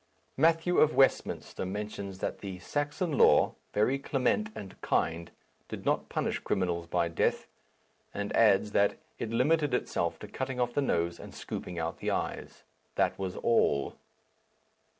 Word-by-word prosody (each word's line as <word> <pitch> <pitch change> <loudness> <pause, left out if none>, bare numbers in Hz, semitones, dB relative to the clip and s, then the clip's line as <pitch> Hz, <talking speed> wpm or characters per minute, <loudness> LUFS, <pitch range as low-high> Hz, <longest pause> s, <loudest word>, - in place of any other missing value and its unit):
Matthew 165 +4 +3
of 155 - +4
Westminster 135 -1 +1
mentions 100 0 -5
that - - -3
the 95 -2 -6
"Saxon 145 - -2
law, - - +6 0.2
very 125 +7 +2
clement 140 - 0
and 95 -2 -9
kind," 85 +1 0 0.4
did - - -7
not - - 0
punish - - -1
criminals 85 -2 -1
by 85 0 +1
death; 85 - 0 0.7
and 100 0 -3
adds 105 -2 +4
that 100 0 +2 0.2
"it 115 - -3
limited 145 +4 +2
itself 85 -8 -1
to 105 - -9
cutting 130 +3 -4
off 120 -1 0
the 145 - +1
nose 85 -10 0
and - - -10
scooping 90 - -6
out 80 0 -3
the - - -2
eyes." - - -3 0.3
That - - +1
was 95 -2 -3
all! 70 - +2
105 Hz, 150 wpm, -30 LUFS, 90-135 Hz, 0.7 s, law